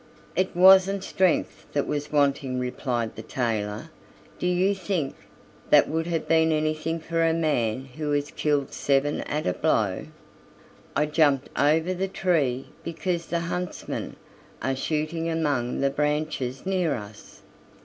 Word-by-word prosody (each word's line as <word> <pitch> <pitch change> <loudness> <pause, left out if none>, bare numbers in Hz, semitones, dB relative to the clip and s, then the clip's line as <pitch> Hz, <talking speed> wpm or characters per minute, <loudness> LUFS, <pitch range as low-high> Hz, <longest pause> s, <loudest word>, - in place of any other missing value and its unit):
"It 185 -1 0
wasn't 190 +1 +6
strength 185 -3 0
that 145 - +1
was 145 0 -3
wanting," 140 -3 +1
replied 125 -2 -2
the - - -7
tailor; 110 -3 -3 0.5
"do 180 - 0
you 180 +3 +2
think 180 -7 -2 0.6
that - - +6
would 160 +1 -1
have 165 -2 -2
been 160 0 +4
anything 155 +1 0
for 165 +1 -1
a 165 0 +3
man 130 -7 0
who 150 +3 -4
has 145 0 -1
killed 145 -2 0
seven 140 +1 +1
at 150 +1 -3
a 90 - +1
blow? - - 0 0.9
I 150 - +3
jumped 150 -3 +2
over 160 +5 +2
the 190 +1 -1
tree 150 -10 0
because 170 +1 -3
the 170 -1 -1
huntsmen 180 +1 -4 0.4
are 135 0 -1
shooting 155 +4 -2
among 145 -8 0
the 140 0 +2
branches 150 -2 -1
near 185 -5 +1
us. 105 -1 -11
155 Hz, 140 wpm, -26 LUFS, 135-170 Hz, 0.9 s, wasn't